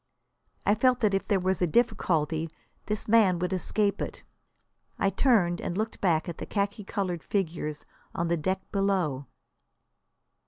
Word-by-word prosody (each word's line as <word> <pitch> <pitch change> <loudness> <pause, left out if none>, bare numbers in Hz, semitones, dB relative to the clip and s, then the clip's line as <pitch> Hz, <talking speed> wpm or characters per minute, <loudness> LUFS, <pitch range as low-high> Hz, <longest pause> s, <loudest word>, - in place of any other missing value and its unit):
I 205 - +5
felt 250 +3 +3
that 210 -3 +3
if 195 - 0
there 200 - +2
was 185 0 0
a 180 - +3
difficulty 165 -6 +1 0.4
this 210 0 -2
man 210 -5 +5
would 180 +2 -1
escape 200 +2 0
it. - - -5 0.7
I 195 - +2
turned 195 -11 +3
and 175 - -3
looked 220 +1 -3
back 165 -5 +2
at 170 - -6
the - - -6
khaki 205 0 -1
coloured 185 -4 -2
figures 160 -6 -2 0.3
on 170 - 0
the 170 - +2
deck 185 +5 -1
below. 185 -9 0
190 Hz, 155 wpm, -28 LUFS, 170-205 Hz, 0.7 s, I